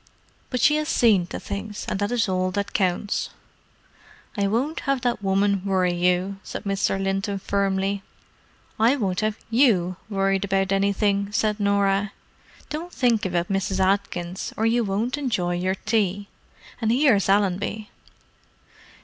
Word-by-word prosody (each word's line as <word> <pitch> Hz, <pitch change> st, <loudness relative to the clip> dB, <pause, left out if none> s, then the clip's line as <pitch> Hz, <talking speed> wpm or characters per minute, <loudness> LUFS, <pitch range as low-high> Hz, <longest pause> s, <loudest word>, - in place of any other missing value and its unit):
But 250 Hz, -, -2 dB
she 300 Hz, 0 st, +5 dB
has 305 Hz, +1 st, -2 dB
seen 205 Hz, -, +3 dB
to -, -, -6 dB
things, 210 Hz, +1 st, -6 dB
so -, -, -1 dB
that 205 Hz, +2 st, -1 dB
is 235 Hz, -3 st, +1 dB
all 185 Hz, -1 st, 0 dB
that 200 Hz, +1 st, -3 dB
counts." 190 Hz, +1 st, 0 dB, 1.1 s
"I 200 Hz, -2 st, +1 dB
won't 255 Hz, +10 st, -1 dB
have 275 Hz, -2 st, +1 dB
that 240 Hz, -3 st, -1 dB
woman 195 Hz, 0 st, +1 dB
worry 185 Hz, -2 st, +1 dB
you," 180 Hz, +2 st, 0 dB
said -, -, -7 dB
Mr. 195 Hz, -1 st, 0 dB
Linton 195 Hz, +1 st, -1 dB
firmly. 195 Hz, 0 st, -1 dB, 0.8 s
"I 230 Hz, +5 st, +4 dB
won't 195 Hz, -8 st, -1 dB
have 215 Hz, 0 st, -1 dB
you 200 Hz, -8 st, +3 dB
worried 195 Hz, -1 st, +1 dB
about 195 Hz, -1 st, 0 dB
anything," 200 Hz, 0 st, +1 dB
said 215 Hz, 0 st, 0 dB
Norah. 200 Hz, 0 st, +1 dB, 0.6 s
"Don't 330 Hz, +4 st, -5 dB
think 235 Hz, -, +1 dB
about 175 Hz, -1 st, -1 dB
Mrs. 195 Hz, -1 st, -1 dB
Atkins, 185 Hz, -2 st, -1 dB
or 220 Hz, -, +1 dB
you 235 Hz, +1 st, +2 dB
won't 220 Hz, +7 st, -1 dB
enjoy 195 Hz, -11 st, -1 dB
your 185 Hz, +2 st, 0 dB
tea. 205 Hz, -2 st, -1 dB, 0.5 s
And 220 Hz, -1 st, +2 dB
here's 240 Hz, -7 st, +3 dB
Allenby." 200 Hz, +2 st, 0 dB
200 Hz, 145 wpm, -24 LUFS, 195-220 Hz, 1.1 s, she